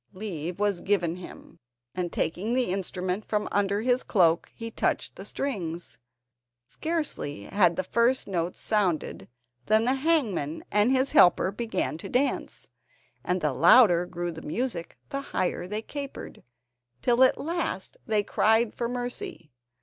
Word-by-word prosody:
Leave 180 -3 -5
was 205 -4 +1
given 180 -4 0
him, 180 - -12 0.3
and 180 -2 -3
taking 195 +9 -1
the 250 -7 +1
instrument 185 +1 -2
from 210 -1 -1
under 200 0 +1
his 250 +2 +2
cloak 170 -5 +2
he 230 0 -6
touched - - -1
the - - -8
strings. 175 - -4 0.7
Scarcely 300 - -3
had 180 - +2
the 185 - -1
first 235 +7 +2
notes 175 -2 -2
sounded 195 -7 -1 0.4
than 220 +1 +4
the 255 - +3
hangman 265 - 0
and 210 +4 +3
his 265 +1 +2
helper 180 +1 +5
began 205 -7 -2
to - - -7
dance, 270 +3 -1 0.6
and 180 0 -1
the 150 -3 +1
louder 175 - +6
grew 175 -1 -4
the 160 -1 -9
music 180 0 -4
the 275 -2 -3
higher 185 -8 -2
they 210 +3 -4
capered, 280 +1 -7 0.6
till 245 +1 +4
at 260 - +4
last 340 - -3
they 215 -2 +2
cried 220 +2 +2
for 235 -1 -3
mercy. 245 - -5
205 Hz, 145 wpm, -27 LUFS, 175-245 Hz, 0.7 s, louder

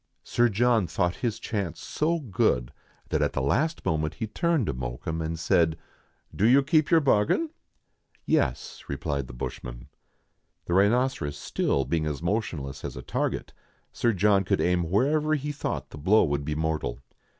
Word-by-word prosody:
Sir 120 0 +2
John 115 -2 +2
thought 90 +2 -1
his 115 -3 -1
chance 100 -8 -3
so 165 +3 0
good, 95 - 0 0.4
that - - 0
at - - +1
the - - -1
last 155 - 0
moment 80 -3 0
he 110 - -3
turned 165 - 0
to 80 - -1
Mokoum 60 +6 -4
and 80 +1 -3
said,— 80 -1 +2 0.3
" - - -24
Do 105 - +3
you 135 +3 +6
keep 155 +1 +3
to - - -1
your 165 - +5
bargain 140 - +2 0.2
?" - - -47
" - - -38
Yes," 65 - 0
replied 70 -1 -3
the - - -10
bushman. - - -7 0.8
The 85 - -2
rhinoceros 100 - +2
still 70 -1 0
being 80 +3 0
as 75 0 -4
motionless 85 -8 -2
as 65 - -5
a 65 - -7
target, - - -2 0.4
Sir 120 - +2
John 100 0 +3
could 100 +1 0
aim 90 -2 +1
wherever 150 - +2
he 145 0 -3
thought 145 - -4
the - - -9
blow 100 +9 +4
would 70 -2 -1
be 75 0 -2
mortal. 80 -6 -1
95 Hz, 180 wpm, -27 LUFS, 75-120 Hz, 0.8 s, you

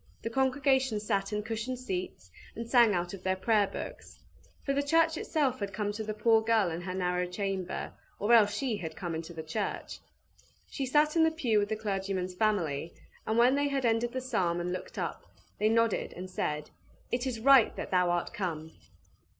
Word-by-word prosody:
The 230 - -3
congregation 265 -2 +2
sat 200 -2 -1
in 210 0 -2
cushioned 225 +3 -3
seats, 185 - -5 0.2
and 230 +1 -5
sang 235 -4 +5
out 175 +1 -2
of 195 - -8
their 190 0 0
Prayer 205 +1 +2
Books. - - -8 0.5
For 275 - +1
the 280 - +1
church 325 +3 +3
itself 280 -5 0
had 200 -1 -4
come 205 0 -1
to 215 +1 -5
the 215 0 -4
poor 225 +1 +4
girl 220 -5 +2
in 165 +2 -4
her 185 +1 -5
narrow 180 -1 0
chamber, 190 -1 -3 0.2
or 210 +4 +2
else 210 -3 +6
she 240 -1 -1
had 160 -4 -6
come 175 -3 -4
into 160 +1 -5
the 160 -2 -7
church. 195 +6 -4 0.7
She 270 -3 -4
sat 300 +4 +3
in 325 - +5
the 320 - +5
pew 255 -10 +1
with 205 0 -1
the 220 - 0
clergyman's 195 -3 -2
family, 170 -7 0 0.3
and 220 - +1
when 245 +2 +5
they 285 +1 +2
had 275 -2 -1
ended 230 +1 +1
the 260 - -3
psalm 185 -9 0
and 175 +1 -2
looked 185 - -7
up, - - -3 0.4
they 215 - +3
nodded 230 -1 +1
and 185 +1 -8
said, 150 -4 -3 0.4
"It 245 +2 -1
is 240 -3 -3
right 265 -1 +6
that - - -6
thou 180 -1 +3
art 175 0 -1
come!" 160 -5 -4
215 Hz, 200 wpm, -30 LUFS, 185-245 Hz, 0.7 s, else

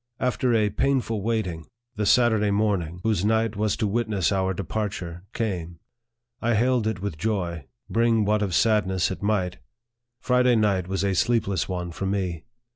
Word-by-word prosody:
After 125 0 +1
a 105 -2 +2
painful 125 -3 0
waiting, 95 -8 -2 0.3
the 105 -1 -1
Saturday 110 -3 +4
morning, 100 -4 +1
88 - - -8
NARRATIVE 85 - -10
OF 90 - -15
THE - - -1
whos& 100 -3 +1
night 110 0 +1
was 105 0 0
to 110 - 0
witness 105 -4 0
our 95 -1 +1
departure, 95 -3 -4
came. 90 -8 -3 0.6
I 120 0 +1
hailed 120 0 +2
it 100 -4 -3
with 80 -7 -4
joy, 85 -8 -2 0.2
bring 115 -2 +2
what 105 +1 +2
of 95 -4 -1
sadness 95 -5 +2
it 95 - -5
might 100 -4 0 0.6
Friday 125 -1 +3
night 100 -5 +1
was 95 0 -1
a 100 -1 +1
sleepless 100 -3 +1
one 90 -1 -3
for 95 +3 -4
me. 90 -5 -2
105 Hz, 180 wpm, -25 LUFS, 95-110 Hz, 0.6 s, Saturday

